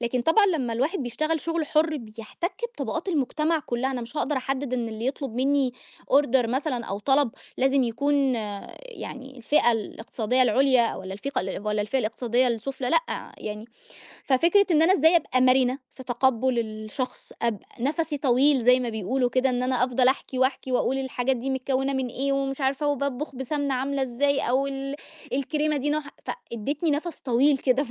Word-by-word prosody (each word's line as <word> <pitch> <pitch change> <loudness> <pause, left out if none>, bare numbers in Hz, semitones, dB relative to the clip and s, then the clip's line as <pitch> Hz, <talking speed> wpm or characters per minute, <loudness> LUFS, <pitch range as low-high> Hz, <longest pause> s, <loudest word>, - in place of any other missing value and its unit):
لكن 245 +1 0
طبعًا 325 - +4
لمّا 275 -11 0
الواحد 280 - 0
بيشتغل 310 +6 -1
شغل 330 0 -2
حُر، 310 +1 +2
بيحتك 230 - -6 0.2
بطبقات - - -3
المجتمع 315 0 +1
كُلّها، 260 -2 -2
أنا 255 -2 -3
مش 240 +5 -9
هاقدر 295 -1 0
أحدد 260 0 -2
إن 235 -2 -2
اللي 220 +2 -4
يطلب 270 -3 -3
مني 265 0 +1 0.4
order 265 -3 +4
مثلًا 260 -1 -1
أو 200 -1 -4
طلب 270 +2 +2 0.3
لازم 270 +1 +3
يكون 275 +3 +1 0.5
يعني 270 - -9
الفئة 240 0 +3
الإقتصادية 225 +2 -1
العُليا 255 -1 +3
والّا 190 0 -6
الفقة 275 +8 -5 0.3
والّا 210 0 +1
الفئة 240 +6 -1
الاقتصادية 245 +2 +1
السُفلى، 250 +2 -3
لأ - - -1
يعني. 210 0 -6 0.6
ففكرة 340 +10 +4
إن 315 -2 +5
أنا 345 +3 +6
إزاي 325 -1 +5
أبقى 255 -6 +1
مرنة 255 0 +4 0.2
في 260 - -10
تقبُّل 255 0 +1
الشخص، 215 +3 -5
أبقى 230 -4 -1
نَفَسي 300 +3 -1
طويل 270 0 +3
زي 250 +2 +5
ما 245 - -2
بيقولوا 235 +4 -1
كده، 260 +1 +2
إن 245 0 -1
أنا 255 -1 +2
أفضل 250 0 +3
أحكي، 265 -1 -1
وأحكي 260 0 0
وأقول 265 +2 +1
الحاجات 260 0 -1
دي 260 +3 -3
متكوّنة 265 +1 0
من 265 -1 -1
إيه، 270 +3 -1
ومش 275 0 -1
عارفة، 275 +2 0
وباطبخ 280 0 -2
بسَمنة 275 +1 -2
عاملة 275 +2 -1
إزاي 275 +3 +1
أو 260 +3 +1
ال 275 0 -4 0.4
الكريمة 300 +3 0
دي 285 +1 -1
نوعها 300 -1 -2 0.4
فادّتني 285 +8 -2
نفس 310 +3 -2
طويل 270 +3 +3
كده 265 +2 +2
ف - - -12
265 Hz, 170 wpm, -25 LUFS, 245-285 Hz, 0.6 s, أنا